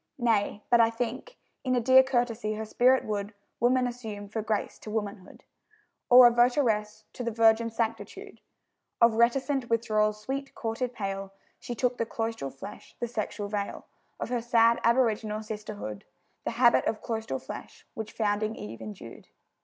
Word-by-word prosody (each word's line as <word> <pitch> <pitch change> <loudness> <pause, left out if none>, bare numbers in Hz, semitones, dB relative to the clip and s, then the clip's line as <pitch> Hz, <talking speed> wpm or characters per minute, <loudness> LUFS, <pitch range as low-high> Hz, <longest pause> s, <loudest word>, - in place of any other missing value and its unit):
Nay, 220 -4 +1
but 240 - +6
I 225 - +5
think 245 - -5 0.3
In 255 -1 +1
a - - +3
dear 260 +2 +7
courtesy 240 -4 -1
her 220 +1 -4
spirit 255 +4 +3
would 205 0 -3 0.2
Woman 250 +2 +3
assume, 220 -5 -6
for 220 +1 -3
grace 215 -1 -2
to - - -9
womanhood. 205 -3 -5 0.7
Or, 245 -1 +9
votaress 230 -4 +2
to 250 - -6
the 235 - -1
virgin 225 0 +3
Sanctitude 225 0 -4 0.6
Of 230 -1 +6
reticent 245 +3 +1
withdrawal's 215 -2 +1
sweet, 270 +5 -5
courted 235 +2 -3
pale, 195 -2 -4 0.3
She 240 - -6
took 250 0 0
the 230 - 0
cloistral 225 -12 -3
flesh, 195 +10 -11
the 240 - -2
sexual 215 -2 -4
veil, 200 -1 -4 0.3
Of - - -4
her 245 -1 -1
sad, 230 0 +4
aboriginal 220 -3 +1
sisterhood; 210 - -6 0.4
The - - -1
habit 240 -1 +5
of 215 - -2
cloistral 225 -1 -3
flesh - - -10
which 220 -1 -6
founding 215 0 -1
Eve 115 +2 -8
indued. 105 -2 -10
225 Hz, 155 wpm, -28 LUFS, 210-240 Hz, 0.7 s, Or